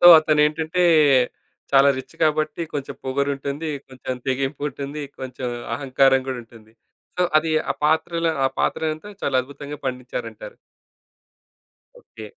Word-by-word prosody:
So 175 - +7
అతనేంటంటే 155 +3 +2 0.9
చాలా 135 +1 +7
rich - - -9
కాబట్టి 155 +1 +1
కొంచెం 140 -2 -4
పొగరుంటుంది, 140 +3 -2 0.2
కొంచెం 130 -1 -6
తెగింపు 135 +2 -1
ఉంటుంది, 140 +2 -6 0.2
కొంచెం 130 -1 -5 0.3
అహంకారం 135 -1 +3
గూడా 130 -1 -3
ఉంటుంది. 115 -1 -18 0.4
సో 180 - +2 0.2
అది 160 +1 -2 0.2
ఆ - - +4
పాత్ర‌ల 165 +2 +2 0.2
ఆ - - +2
పాత్రలంతా 160 +6 -1
చాలా 135 -2 +1
అద్భుతంగా 140 +2 -8
పండించారంటారు. 130 - -5 1.4
ఓకే. - - -12
140 Hz, 115 wpm, -23 LUFS, 130-155 Hz, 1.4 s, సో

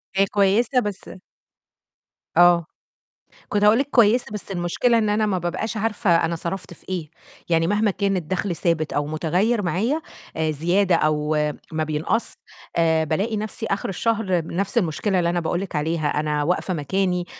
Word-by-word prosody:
هي 195 - +4
كويسة 210 +6 +2
بس 205 -5 -5 1.3
آه، 175 -1 +6 0.8
كنت 205 0 +1
هاقول 210 +3 +6
لِك 280 - 0
كويسة، 235 +1 +4
بس 210 -1 -6
المشكلة 195 +6 +1
إن 215 -2 +1
أنا 215 +1 +2
ما 195 -3 0
بابقاش 185 +6 -3
عارفة 210 -6 +1
أنا 170 +1 -1
صرفت 175 +2 -5
في - - -17
إيه. 175 -5 -4 0.4
يعني 165 -1 +2
مهما 205 +3 +2
كان 195 0 0
الدَخْل 180 +1 -2
ثابت 165 -3 0
أو 145 0 0
مُتغيّر، 180 +9 0
معايا 225 - 0 0.3
آآ 160 -1 0
زيادة 175 +5 +2
أو 155 -1 +1 0.4
ما 155 0 0
بينقص، 155 +9 -1 0.4
آآ 160 -1 +3
بالاقي 195 +9 -1
نَفْسي 215 +1 -3
آخِر 195 -1 -2
الشهر 195 -3 0
نَفْس 195 +5 -1
المشكلة 185 +1 0
اللي 170 -1 +1
أنا 175 0 0
باقول 170 +2 -1
لِك 190 -4 -5
عليها، 155 +1 -1
أنا 150 -1 -1
واقفة 180 +3 0
مكاني 180 +3 -1
185 Hz, 160 wpm, -23 LUFS, 165-210 Hz, 1.3 s, آه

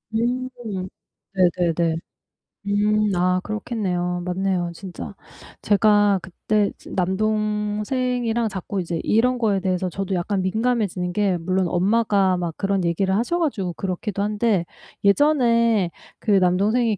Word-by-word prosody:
음, 250 +3 0 0.9
네네네. 175 -2 +2 0.7
음 210 +1 +2
아, 180 +1 +2
그렇겠네요. 185 -5 -2
맞네요, 180 -1 -1
진짜. 185 +1 -8 0.5
제가 205 -1 +4
그때 205 +3 -1
진 - - -12
남동생이랑 215 +4 0
자꾸 190 0 -4
이제 170 -1 -3
이런 250 +3 +2
거에 210 -5 +1
대해서 185 -1 0
저도 195 +2 -3
약간 190 +2 -1
민감해지는 200 -3 0
게 195 -2 +1
물론 185 +2 0
엄마가 195 0 +2
막 175 -2 -3
그런 195 -2 0
얘기를 190 +3 +1
하셔 240 - 0
가지고 200 - -1
그렇기도 195 +2 -3
한데 210 -3 +1 0.4
예전에 230 - +3 0.3
그 215 - -1
남동생이 200 +4 +3
200 Hz, 270 characters per minute, -22 LUFS, 180-220 Hz, 0.9 s, 제가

